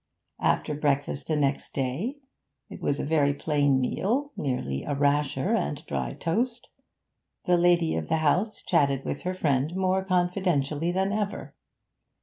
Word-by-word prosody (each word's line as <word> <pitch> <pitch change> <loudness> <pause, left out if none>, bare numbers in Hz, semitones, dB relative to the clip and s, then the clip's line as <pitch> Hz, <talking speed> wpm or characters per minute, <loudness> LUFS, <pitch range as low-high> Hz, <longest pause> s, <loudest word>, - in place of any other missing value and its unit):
After 150 - +1
breakfast 145 -1 -1
the 155 - +1
next 140 -2 -1
day 145 - -2 0.5
it - - -9
was 140 - 0
a - - -2
very 145 -2 +2
plain 145 -3 +2
meal, 240 - 0
merely 95 - -2
a 145 - -2
rasher 145 +5 +1
and 150 -9 -1
dry - - -3
toast 235 +8 -2 0.8
the 180 - +4
lady 175 -1 +3
of 80 -1 -3
the - - +2
house 180 +8 +1
chatted 140 -5 +2
with 140 - -3
her 185 +1 -3
friend 145 -1 0
more 190 0 +1
confidentially 175 -4 0
than 190 +2 0
ever. 210 -1 -3
160 Hz, 145 wpm, -27 LUFS, 140-185 Hz, 0.8 s, the